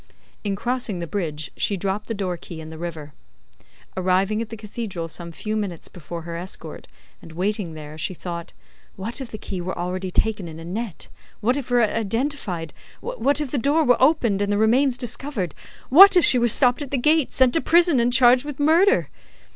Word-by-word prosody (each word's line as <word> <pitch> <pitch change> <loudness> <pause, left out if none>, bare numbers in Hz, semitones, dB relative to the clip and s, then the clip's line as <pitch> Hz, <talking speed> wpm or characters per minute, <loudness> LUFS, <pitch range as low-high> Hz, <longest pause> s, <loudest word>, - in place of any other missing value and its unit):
In 200 -2 -1
crossing 240 -2 -2
the 170 - -4
bridge, 155 -5 -4
she 200 - 0
dropped 195 +3 -3
the 225 - -3
door 190 -3 -2
key 170 -1 -10
in 160 0 -9
the 160 - -9
river. 160 -4 -6 0.8
Arriving 190 +3 +1
at 230 - -5
the 225 - -7
cathedral 210 -5 -5
some 170 +1 -7
few 215 +6 -4
minutes 195 -6 -4
before 170 -1 -8
her 170 0 -6
escort, 180 +3 -7 0.3
and 165 - -12
waiting 185 -1 -2
there, 155 0 -9
she 185 - -2
thought, 170 -1 -6 0.4
what 225 +7 -4
if 260 - -6
the 215 - -7
key 190 -3 -5
were 185 +2 -4
already 185 +2 -3
taken 205 0 -1
in 160 0 -9
a 165 - -9
net, 205 +2 -5 0.3
what 240 +5 +1
if 280 -3 -4
it 245 - +1
were 240 - +5
identified, 220 - -2 0.3
what 385 - 0
if 295 -4 -3
the 280 - 0
door 290 +6 +2
were 245 -4 +3
opened 255 -8 +3
and 205 0 0
the 205 - +1
remains 245 +4 +3
discovered, 245 - -3 0.4
what 385 +7 +9
if 350 - +5
she 250 - +3
were 240 - +3
stopped 245 +3 +3
at 285 - -5
the 275 - -1
gate, 305 +3 +2
sent 260 -2 +4
to 325 - +3
prison, 340 -4 +4
and 235 +1 +2
charged 250 0 +5
with 290 -2 -7
murder! 340 +10 +4
215 Hz, 205 wpm, -23 LUFS, 175-255 Hz, 0.8 s, what